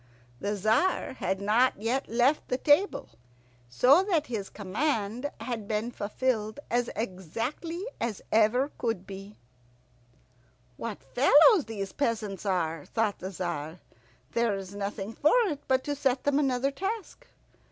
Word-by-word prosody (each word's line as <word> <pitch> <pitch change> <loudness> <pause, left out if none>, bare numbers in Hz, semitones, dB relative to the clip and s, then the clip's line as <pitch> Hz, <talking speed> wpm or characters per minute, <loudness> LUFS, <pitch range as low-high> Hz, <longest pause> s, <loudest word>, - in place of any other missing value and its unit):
The 205 +7 -1
Tzar 220 - +1
had 190 - -1
not 215 +4 +2
yet 240 +5 -1
left 250 +6 +2
the 250 - 0
table, 295 +9 +2 0.6
so 255 - +5
that 335 -7 +1
his 215 -7 -4
command 225 +3 -2
had 230 -5 -4
been 220 +2 -1
fulfilled 220 +1 -2
as 240 0 +1
exactly 230 - -4
as 230 -4 -2
ever 235 +6 +3
could 225 -6 -2
be. 195 +2 -9 1.4
"What 220 - -6
fellows 295 - +6
these 200 -3 -5
peasants 215 -7 -2
are," 165 -5 0
thought 220 -3 0
the 185 - -5
Tzar. 175 -3 -4 0.5
"There 230 0 +1
is 195 0 -7
nothing 200 +1 -4
for 300 - +3
it 300 -8 -3
but 260 0 +2
to 290 - -2
set 265 -2 0
them 285 0 +2
another 270 -1 +1
task." 410 - -5
230 Hz, 135 wpm, -28 LUFS, 200-275 Hz, 1.4 s, fellows